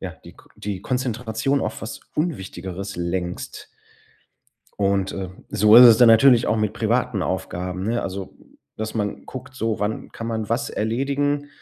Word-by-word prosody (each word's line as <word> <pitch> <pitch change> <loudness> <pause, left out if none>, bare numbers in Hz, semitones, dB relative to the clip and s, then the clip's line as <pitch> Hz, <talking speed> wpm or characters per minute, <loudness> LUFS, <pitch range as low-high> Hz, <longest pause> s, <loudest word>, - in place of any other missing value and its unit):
ja, - - -5
die - - -12
K - - -20
die 100 -3 -5
Konzentration 125 +2 -1
auf - - -4
was 110 - -7
Unwichtigeres 100 - -4
lenkst. 90 0 -4 1.1
Und, 100 -1 +1
äh, 95 -2 -5 0.2
so 105 +2 +4
ist 125 - +11
es 115 -2 +8
dann 120 0 +7
natürlich 120 +1 +6
auch 110 - +1
mit 110 -1 -1
privaten 115 -2 0
Aufgaben, 90 0 -3
ne? 115 +3 0
Also, 95 0 -6 0.4
dass 110 0 -4
man 105 -2 -3
guckt 130 0 -9
so: 115 -4 -2
„Wann 105 +1 -3
kann 115 - -6
man 110 -2 -3
was 115 +2 -1
erledigen? 140 +6 -1
110 Hz, 160 wpm, -22 LUFS, 100-125 Hz, 1.1 s, ist